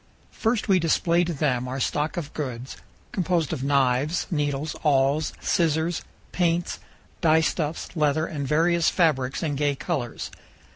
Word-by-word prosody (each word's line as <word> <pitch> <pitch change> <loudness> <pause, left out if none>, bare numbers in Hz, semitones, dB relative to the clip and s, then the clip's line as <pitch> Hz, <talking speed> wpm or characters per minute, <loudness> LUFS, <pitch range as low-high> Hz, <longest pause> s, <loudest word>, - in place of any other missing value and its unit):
First, 225 -1 0
we 190 -2 +4
display 170 +1 +2
to 175 - -2
them 130 -5 0
our 130 +2 -4
stock 150 +5 -1
of 155 -3 -4
goods, 130 -3 -5 0.4
composed 175 -4 0
of 130 - -4
knives, 140 +3 +2
needles, 145 -1 -1
awls, 145 +1 +2
scissors, 165 0 +1 0.3
paints, 175 -1 0 0.4
dyestuffs, 160 -1 +1
leather, 155 0 +2
and 145 -4 -4
various 165 +3 +3
fabrics 140 -7 +1
in 150 -3 -1
gay 145 0 +1
colors. 135 -6 -3
155 Hz, 135 wpm, -25 LUFS, 140-170 Hz, 0.4 s, we